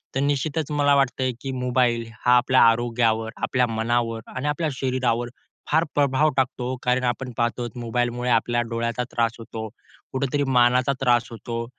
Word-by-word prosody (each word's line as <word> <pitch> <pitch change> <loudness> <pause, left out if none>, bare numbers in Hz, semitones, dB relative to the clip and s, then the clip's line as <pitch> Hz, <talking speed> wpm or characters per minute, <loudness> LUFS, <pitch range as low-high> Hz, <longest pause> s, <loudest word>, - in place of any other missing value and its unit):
तर - - +1
निश्चितच 145 +2 -1
मला 145 -1 +3
वाटतंय 130 -1 +1
की 135 - -4
मोबाईल 125 -2 0 0.2
हा 125 0 +6
आपल्या 130 +1 +3
आरोग्यावर, 115 -1 +2
आपल्या 125 -2 +1
मनावर 115 0 -1
आणि 130 +3 -2
आपल्या 155 +2 0
शरीरावर 125 -2 -1 0.4
फार 160 +2 +4
प्रभाव 145 +1 +3
टाकतो 130 -1 -1
कारण 125 +1 +1
आपण 125 +1 -3
पाहतो 120 +1 0
आहोत 120 +1 -6
मोबाईलमुळे 120 +1 -1
आपल्या 120 0 +2
डोळ्याचा 115 +1 -2
त्रास 115 -1 +1
होतो, 110 -1 -6 0.4
कुठेतरी 140 +2 -1
मानाचा 125 0 +3
त्रास 120 -2 +3
होतो 115 +1 -5
125 Hz, 155 wpm, -23 LUFS, 115-130 Hz, 0.4 s, हा